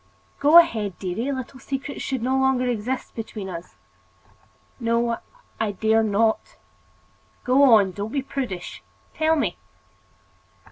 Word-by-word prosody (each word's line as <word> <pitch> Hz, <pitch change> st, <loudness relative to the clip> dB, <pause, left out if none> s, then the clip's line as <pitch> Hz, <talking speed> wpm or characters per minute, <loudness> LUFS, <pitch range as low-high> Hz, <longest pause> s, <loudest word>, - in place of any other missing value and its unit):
"Go 295 Hz, +4 st, +7 dB
ahead, 220 Hz, -, +4 dB
dearie. 210 Hz, +9 st, -3 dB
Little 260 Hz, 0 st, -6 dB
secrets 275 Hz, +2 st, -5 dB
should 260 Hz, -4 st, -3 dB
no 260 Hz, +2 st, +1 dB
longer 265 Hz, -1 st, +2 dB
exist 245 Hz, +1 st, -3 dB
between 215 Hz, -3 st, -6 dB
us." 170 Hz, -2 st, -8 dB, 1.0 s
"No, 235 Hz, 0 st, 0 dB, 0.4 s
I 215 Hz, -2 st, -1 dB
dare 220 Hz, +3 st, +2 dB
not." 220 Hz, +1 st, 0 dB, 0.9 s
"Go 255 Hz, -1 st, +6 dB
on; 195 Hz, -2 st, +1 dB
don't 205 Hz, +3 st, -5 dB
be 275 Hz, -1 st, -1 dB
prudish. 250 Hz, -10 st, -5 dB, 0.3 s
Tell 320 Hz, 0 st, +2 dB
me." 300 Hz, -, -1 dB
235 Hz, 125 wpm, -23 LUFS, 210-265 Hz, 1.0 s, Go